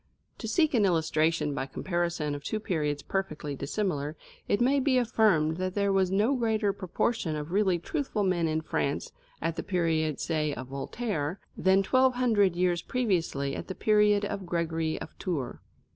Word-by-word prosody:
To 225 - -5
seek 305 +8 +2
an 230 -4 +4
illustration 160 -4 +2
by 135 -1 -3
comparison 170 0 -2
of 145 0 -6
two 215 - -2
periods 150 -8 -1
perfectly 155 -7 -3
dissimilar, 150 0 -2 0.3
it 205 - +2
may 265 +3 +3
be 265 -1 +2
affirmed 210 -10 +3
that 185 0 -2
there 200 -1 +2
was 190 -1 +3
no 210 +8 +2
greater 220 -5 +1
proportion 185 -2 -1
of 150 +2 -5
really 190 -2 +3
truthful 225 - -2
men 180 -3 +1
in 160 0 0
France 140 -2 -2 0.3
at 165 0 -1
the - - -1
period, 165 -5 0
say, 155 -3 -1
of 130 0 -7
Voltaire, 160 - -3 0.2
than 190 +1 +3
twelve 255 +4 +3
hundred 215 -7 +3
years 175 -1 +1
previously 165 - -1
at - - -6
the 190 - -5
period 210 -1 +3
of 195 -2 -4
Gregory 165 -2 -1
of - - -9
Tours. 150 -10 -3
180 Hz, 170 wpm, -28 LUFS, 155-210 Hz, 0.3 s, an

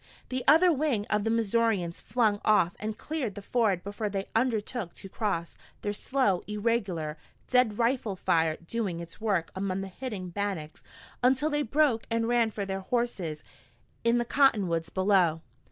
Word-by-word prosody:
The 255 0 -2
other 325 +5 +7
wing 270 -8 0
of 210 0 +1
the - - +1
Missourians 225 -5 +1
flung 215 -3 +1
off 200 -5 +3
and 215 0 -4
cleared 280 -9 -3
the 205 - -6
ford 205 -6 +1
before 205 +1 -3
they 195 -1 -3
undertook 225 -4 -1
to - - -9
cross, 190 -6 -3 0.2
their 205 - -2
slow, 210 -5 +1
irregular, 205 -8 -1 0.3
deadly 250 -4 +3
rifle 235 -3 0
fire 160 -3 +1
doing 195 -4 -2
its 170 +3 -10
work 195 -7 0
among 190 0 -2
the 195 - -5
hidden 195 -3 -6
Bannacks 185 -6 -4 0.4
until 265 +5 +3
they 295 0 +1
broke 275 -3 +2
and 230 0 0
ran 235 -1 +3
for 205 -2 -4
their 195 0 -3
horses 190 -9 -2 0.6
in 235 +1 +3
the 240 - 0
cottonwoods 200 - +2
below. 185 -4 +2
210 Hz, 160 wpm, -28 LUFS, 185-240 Hz, 0.6 s, other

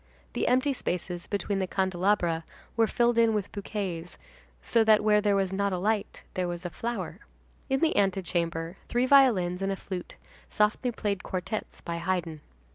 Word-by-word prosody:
The - - -1
empty 260 +3 +3
spaces 180 -6 -3
between 200 -1 -1
the 190 - -1
candelabra 185 -3 +1 0.3
were 225 -1 +3
filled 240 0 +2
in 225 -1 +4
with 205 -2 -2
bouquets, 190 -4 -4 0.4
so 230 -1 +2
that 215 -1 +5
where 210 -1 +4
there 205 -1 +2
was 195 -1 0
not 200 0 0
a - - 0
light, 210 +3 -1
there 185 -1 -1
was 175 +1 -5
a 175 - -3
flower. 235 +6 -4 0.5
In 270 +2 +1
the 325 -1 +2
antechamber, 175 -3 0
three 245 +1 +2
violins 220 -10 +4
and 195 0 0
a - - -1
flute 185 -2 -7 0.3
softly 215 +4 +1
played 205 -4 -2
quartettes 185 +3 -4
by 170 0 -4
Haydn. 170 -3 -2
195 Hz, 170 wpm, -28 LUFS, 180-220 Hz, 0.5 s, that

